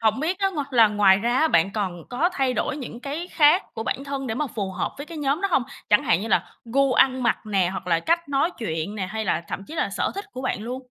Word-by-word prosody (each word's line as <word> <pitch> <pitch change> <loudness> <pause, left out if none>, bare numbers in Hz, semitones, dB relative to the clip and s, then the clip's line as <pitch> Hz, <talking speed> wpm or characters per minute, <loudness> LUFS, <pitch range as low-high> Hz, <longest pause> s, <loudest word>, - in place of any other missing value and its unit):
hổng 220 +3 +2
biết 355 +4 -1
á 390 -1 +2
ng 305 -6 -2
là 225 -3 +7
ngoài 200 -2 +4
ra 240 +4 +1
á, 320 - +4
bạn 195 - +3
còn 185 -6 -3
có 295 +9 +2
thay 265 -5 0
đổi - - -1
những 245 -4 -7
cái 300 +7 -5
khác 305 +4 +5
của 225 - -3
bản 275 +4 -3
thân 275 -1 -4
để 220 - -2
mà 300 +3 -1
phù 205 -5 -4
hợp - - -2
với 285 +2 -7
cái 330 -2 -8
nhóm 285 +3 0
đó 395 - 0
hông? 275 - +3 0.3
Chẳng 210 - +5
hạn 170 - +3
như 225 - -4
là - - +2 0.2
gu 270 +3 +2
ăn 260 0 +3
mặc 235 - +2
nè 195 -4 +2
hoặc 190 -1 -6
là 165 -2 +2
cách 335 - 0
nói 280 +4 +1
chuyện 165 -2 -3
nè, 190 -3 -3
hay 220 +3 -4
là 170 - 0
thậm 195 - -5
chí 320 - -9
là 200 - -1
sở 200 - -1
thích 400 +1 -5
của 255 - -6
bạn 235 -4 -2
luôn. 255 +3 -5
250 Hz, 285 wpm, -24 LUFS, 205-290 Hz, 0.3 s, là